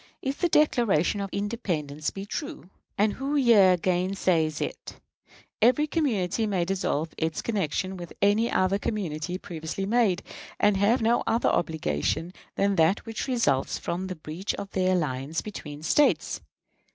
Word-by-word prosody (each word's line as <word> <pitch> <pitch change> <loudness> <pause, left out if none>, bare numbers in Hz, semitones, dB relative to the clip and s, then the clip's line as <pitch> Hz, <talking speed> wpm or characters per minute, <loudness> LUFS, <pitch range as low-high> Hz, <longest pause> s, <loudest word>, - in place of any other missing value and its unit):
If 270 +1 -2
the 350 - +2
Declaration 230 - +2
of 195 - -3
Independence 175 -9 -2
be 195 0 -7
true 290 - -6 0.3
(and 205 +1 +2
who 275 +2 -3
here 210 -9 +6
gainsays 175 -3 +1
it?), - - -5 0.6
every 255 +7 +4
community 225 - 0
may 185 -4 0
dissolve 170 -4 -1
its 160 -1 -1
connection 190 -2 -1
with 175 -2 -8
any 210 +4 +3
other 185 +2 +1
community 175 -6 -3
previously 170 +2 -5
made, 210 -4 +2 0.4
and 205 -1 +4
have 215 +5 +2
no 235 +2 +3
other 230 - +2
obligation 160 - -1 0.2
than 200 -1 +1
that 165 +5 +3
which 225 +2 -4
results 230 - +1
from 180 +2 -3
the 185 - -5
breach 160 +4 -4
of 200 -1 -8
an 185 -1 +2
alliance 150 -4 -1
between 150 -8 -8
States. 290 - +2
190 Hz, 145 wpm, -26 LUFS, 165-225 Hz, 0.6 s, here